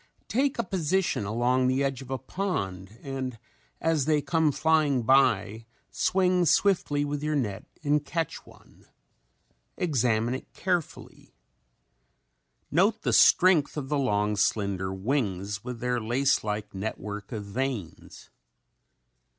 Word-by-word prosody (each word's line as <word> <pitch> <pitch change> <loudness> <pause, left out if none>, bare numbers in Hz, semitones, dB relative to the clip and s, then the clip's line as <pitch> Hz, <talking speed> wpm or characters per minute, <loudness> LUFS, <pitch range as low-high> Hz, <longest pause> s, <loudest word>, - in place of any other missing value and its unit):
Take 270 +3 +1
a 235 - 0
position 185 - 0
along 120 +4 +1
the 130 +2 +1
edge 135 -2 -2
of 130 - -11
a 135 - -2
pond 105 - -4
and 130 -3 -4 0.4
as 160 -4 +1
they 155 -1 +3
come 160 0 +1
flying 150 -4 +2
by 110 -4 +2 0.2
swing 180 -2 +2
swiftly 150 -6 +2
with 145 0 -3
your 150 0 -1
net 105 -9 -2 0.2
and 150 0 +2
catch 165 +1 -3
one. - - -20 0.9
Examine 120 -7 +1
it 130 - -7
carefully. 175 -4 -4 1.4
Note 195 +9 +2
the - - 0
strength 175 -5 +5
of 135 -2 -4
the 150 -1 +1
long, 105 -5 +1
slender 100 -2 0
wings 100 -2 -2
with 125 -2 -7
their 125 -1 0
lace 130 +5 +1
like 105 -1 -4
network 105 0 -5
of 105 -4 -5
veins. 115 - -5
130 Hz, 125 wpm, -27 LUFS, 110-155 Hz, 1.4 s, strength